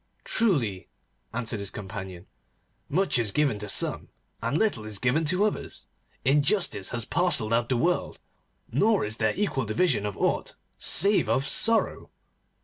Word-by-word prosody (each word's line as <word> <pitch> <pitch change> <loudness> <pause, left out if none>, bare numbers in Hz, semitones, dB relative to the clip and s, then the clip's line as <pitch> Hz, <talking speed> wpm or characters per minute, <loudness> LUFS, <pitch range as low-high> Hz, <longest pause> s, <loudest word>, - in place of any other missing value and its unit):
'Truly,' 135 - 0 0.4
answered 115 -1 -3
his 100 -1 -3
companion, 95 -2 -8 0.6
'much 185 -3 +2
is 115 -3 +3
given 140 -6 +1
to 105 0 -6
some, - - -1 0.3
and 145 - 0
little 205 - 0
is 105 -1 -3
given 125 +8 +1
to 185 +6 +2
others. 215 - -4 0.4
Injustice 140 - +2
has 120 -2 -1
parcelled 155 -11 +1
out 120 0 +1
the 130 - +1
world, 175 +7 0 0.5
nor 215 - +2
is 110 +1 -4
there 110 -1 +1
equal 190 - -1
division 110 - +1
of 100 - -6
aught - - -1 0.2
save 200 - +3
of 130 +5 +1
sorrow. 230 +7 +2
125 Hz, 145 wpm, -26 LUFS, 105-180 Hz, 0.6 s, is